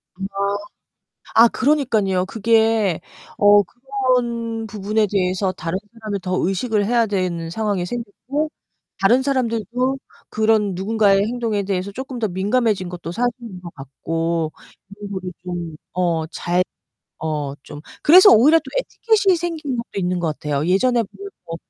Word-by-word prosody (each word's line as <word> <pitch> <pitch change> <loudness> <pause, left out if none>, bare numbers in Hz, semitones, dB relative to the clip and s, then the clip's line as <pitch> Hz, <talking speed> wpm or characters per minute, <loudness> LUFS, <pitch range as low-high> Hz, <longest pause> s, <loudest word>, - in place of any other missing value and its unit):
아. 195 - -15 1.2
아, - - +8
그러니깐요. 225 -10 +1
그게 220 -3 +2 0.4
어 205 0 +6
그런 240 -2 -2
부분에 210 +1 0
대해서 185 -1 +1
다른 165 0 -3 0.2
사람을 215 -3 -4
더 185 0 -1
의식을 205 +1 0
해야 235 0 +3
되는 180 -5 -2
상황이 200 -1 -1
생겼고 245 +7 -4 0.5
다른 235 +7 +4
사람들도 255 -1 0 0.3
그런 215 -2 +2
누군가의 200 0 +3
행동에 225 -4 -1
대해서 190 0 -2
쪼끔 260 +2 -6
더 220 - +1
민감해진 200 +1 0
것도 175 -2 -6
사실인 230 -2 -3
것 170 -2 -9
같고 165 +4 -2 0.5
여러모로 190 -3 -6
좀 175 -3 -5 0.2
어 170 -3 0
잘 175 +2 0 0.6
어 150 -3 -2
좀 145 0 -10 0.2
그래서 370 +6 +9
오히려 295 +9 +6
또 - - -11
에티켓이 435 -6 +2
생긴 325 -6 -3
것도 235 - -5
있는 180 0 0
것 175 - -1
같아요. 150 0 -1
예전에 235 +7 +3
보면 400 - -10 0.2
뭐 165 0 -5
205 Hz, 295 characters per minute, -21 LUFS, 180-240 Hz, 1.2 s, 그래서